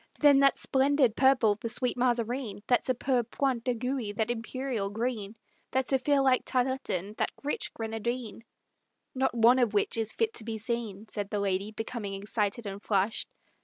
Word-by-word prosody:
"Then 285 Hz, -2 st, +6 dB
that 275 Hz, 0 st, +4 dB
splendid 265 Hz, -3 st, +2 dB
purple, 245 Hz, -6 st, +4 dB
the 230 Hz, -, -3 dB
sweet 250 Hz, +2 st, +1 dB
Mazarine; 240 Hz, -3 st, -1 dB
That 245 Hz, +1 st, +3 dB
superb 250 Hz, -2 st, 0 dB
point 260 Hz, -4 st, 0 dB
d'aiguille, 250 Hz, -3 st, -2 dB
that 220 Hz, +2 st, 0 dB
imperial 240 Hz, -2 st, -3 dB
green, 220 Hz, -1 st, -3 dB, 0.3 s
That 260 Hz, -1 st, 0 dB
zephyr 275 Hz, +1 st, +3 dB
like 260 Hz, -2 st, +4 dB
tarletan, 250 Hz, -7 st, -1 dB
that -, -, +1 dB
rich 290 Hz, -, -2 dB
grenadine" 225 Hz, +1 st, -4 dB, 0.7 s
"Not 265 Hz, -2 st, 0 dB
one 235 Hz, +3 st, +5 dB
of 245 Hz, -, +4 dB
all -, -, +5 dB
which 205 Hz, -, +1 dB
is 220 Hz, -1 st, -1 dB
fit 455 Hz, -1 st, 0 dB
to 225 Hz, -, -2 dB
be 225 Hz, 0 st, -4 dB
seen," 220 Hz, -2 st, -4 dB
Said 205 Hz, -2 st, -4 dB
the 210 Hz, -, -2 dB
lady, 195 Hz, 0 st, -1 dB
becoming 220 Hz, -2 st, -5 dB
excited 210 Hz, +2 st, -2 dB
and 200 Hz, 0 st, -6 dB
flushed. 205 Hz, +2 st, 0 dB
235 Hz, 165 wpm, -29 LUFS, 215-260 Hz, 0.7 s, Then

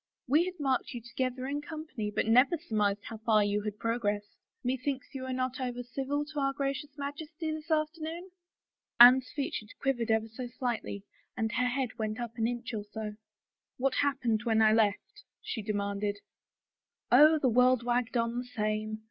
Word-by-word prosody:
" -, -, -62 dB
We 300 Hz, +7 st, +4 dB
had 365 Hz, -2 st, -6 dB
marked 265 Hz, -3 st, 0 dB
you 240 Hz, -, -5 dB
together 255 Hz, +2 st, -3 dB
in 285 Hz, +2 st, -2 dB
company 295 Hz, -8 st, -5 dB
but 210 Hz, -, 0 dB
never 250 Hz, +9 st, +5 dB
surmised 210 Hz, -9 st, 0 dB
how 225 Hz, -, -7 dB
far 220 Hz, -1 st, +3 dB
you 205 Hz, 0 st, 0 dB
had 210 Hz, 0 st, -4 dB
progressed.... 210 Hz, -3 st, -2 dB, 0.3 s
Methinks 260 Hz, +2 st, -2 dB
you 270 Hz, -, -5 dB
were 260 Hz, 0 st, -4 dB
not 255 Hz, 0 st, -2 dB
over 245 Hz, -1 st, -3 dB
civil 270 Hz, +4 st, -2 dB
to 300 Hz, -1 st, -5 dB
our 275 Hz, 0 st, +1 dB
Gracious 275 Hz, +1 st, -3 dB
Majesty 305 Hz, +3 st, -5 dB
this 310 Hz, +1 st, -6 dB
afternoon? 320 Hz, +3 st, -2 dB, 0.3 s
" -, -, -63 dB
Anne's 250 Hz, +1 st, +9 dB
features 250 Hz, -7 st, -4 dB
quivered 245 Hz, -5 st, 0 dB
ever 220 Hz, 0 st, +2 dB
so 245 Hz, +3 st, -6 dB
slightly 240 Hz, -5 st, -3 dB, 0.3 s
and 220 Hz, -1 st, 0 dB
her 250 Hz, +2 st, +1 dB
head 250 Hz, -2 st, -2 dB
went 215 Hz, 0 st, -2 dB
up 235 Hz, -2 st, -4 dB
an 225 Hz, -, +2 dB
inch 240 Hz, 0 st, -4 dB
or 210 Hz, -2 st, -3 dB
so. 210 Hz, 0 st, -6 dB, 0.3 s
" -, -, -63 dB
What 265 Hz, +1 st, +1 dB
happened 255 Hz, -6 st, +1 dB
when 225 Hz, -1 st, +2 dB
I 215 Hz, -1 st, +6 dB
left? 225 Hz, -, +1 dB
" -, -, -62 dB
she 225 Hz, -, -2 dB
demanded. 205 Hz, -1 st, -2 dB, 0.5 s
" -, -, -51 dB
Oh, 305 Hz, +6 st, +8 dB
the 270 Hz, -4 st, +2 dB
world 250 Hz, +1 st, +4 dB
wagged 245 Hz, 0 st, 0 dB
on 235 Hz, +1 st, 0 dB
the -, -, -3 dB
same. 215 Hz, -2 st, -2 dB
245 Hz, 190 wpm, -30 LUFS, 220-280 Hz, 0.5 s, Anne's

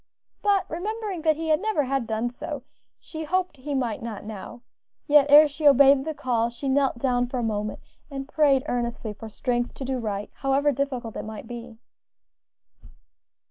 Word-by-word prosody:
But 395 Hz, -2 st, +2 dB
remembering 405 Hz, +1 st, -4 dB
that 315 Hz, -1 st, +3 dB
he 320 Hz, 0 st, +2 dB
never 415 Hz, -3 st, 0 dB
had 265 Hz, -3 st, -1 dB
done 225 Hz, +2 st, -1 dB
so, 295 Hz, +1 st, -6 dB, 0.4 s
she 315 Hz, -1 st, -7 dB
hoped 365 Hz, 0 st, -1 dB
he 280 Hz, +2 st, -4 dB
might 240 Hz, -5 st, -1 dB
not 225 Hz, -3 st, -6 dB
now; 215 Hz, +3 st, -8 dB, 0.4 s
yet 290 Hz, -1 st, +5 dB
ere 300 Hz, +2 st, +9 dB
she 295 Hz, +1 st, 0 dB
obeyed 275 Hz, 0 st, +6 dB
the 315 Hz, -1 st, -3 dB
call 235 Hz, -3 st, 0 dB
she 235 Hz, +4 st, -6 dB
knelt 270 Hz, -1 st, +2 dB
down 245 Hz, -1 st, +1 dB
for 255 Hz, -, -4 dB
a 245 Hz, -, -1 dB
moment, 210 Hz, -1 st, -2 dB, 0.3 s
and 275 Hz, -1 st, -6 dB
prayed 290 Hz, -4 st, +3 dB
earnestly 235 Hz, -3 st, -3 dB
for 220 Hz, +2 st, -9 dB
strength 240 Hz, +2 st, -2 dB
to 270 Hz, -, -6 dB
do 260 Hz, 0 st, -2 dB
right, 210 Hz, -3 st, -4 dB
however 275 Hz, +2 st, +2 dB
difficult 260 Hz, -4 st, -3 dB
it -, -, -4 dB
might 220 Hz, 0 st, -7 dB
be. 235 Hz, -1 st, -8 dB
270 Hz, 175 wpm, -25 LUFS, 235-295 Hz, 0.4 s, ere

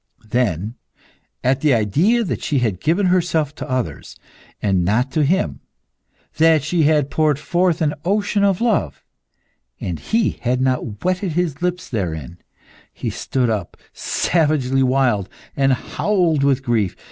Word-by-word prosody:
Then, 110 Hz, -2 st, -1 dB, 0.7 s
at 130 Hz, +1 st, +1 dB
the 150 Hz, -5 st, +4 dB
idea 160 Hz, -, +2 dB
that 190 Hz, -, -3 dB
she 145 Hz, -, 0 dB
had 110 Hz, -8 st, 0 dB
given 175 Hz, +6 st, +1 dB
herself 170 Hz, -5 st, +1 dB
to -, -, -8 dB
others, 130 Hz, -1 st, -3 dB, 0.4 s
and 95 Hz, -3 st, +1 dB
not 120 Hz, +8 st, +1 dB
to 155 Hz, -, +1 dB
him; 185 Hz, +7 st, 0 dB, 0.8 s
that 160 Hz, -2 st, +4 dB
she 165 Hz, +3 st, 0 dB
had 150 Hz, -2 st, +2 dB
poured 155 Hz, -3 st, +2 dB
forth 175 Hz, +1 st, +1 dB
an 150 Hz, -1 st, +1 dB
ocean 205 Hz, +2 st, +1 dB
of 195 Hz, -1 st, +2 dB
love, 185 Hz, -, 0 dB, 0.8 s
and 85 Hz, -4 st, -4 dB
he 220 Hz, -4 st, 0 dB
had 125 Hz, 0 st, 0 dB
not 125 Hz, -5 st, -1 dB
wetted 185 Hz, -1 st, 0 dB
his 170 Hz, -4 st, -1 dB
lips 180 Hz, -1 st, -2 dB
therein, 85 Hz, -, -4 dB, 0.5 s
he -, -, -4 dB
stood 125 Hz, -3 st, -1 dB
up, 100 Hz, -6 st, -4 dB, 0.2 s
savagely 145 Hz, -5 st, +1 dB
wild, 125 Hz, -7 st, +2 dB, 0.3 s
and 135 Hz, -1 st, +2 dB
howled 170 Hz, +1 st, 0 dB
with 135 Hz, -1 st, +2 dB
grief. 110 Hz, -7 st, 0 dB
140 Hz, 145 wpm, -20 LUFS, 120-175 Hz, 0.8 s, the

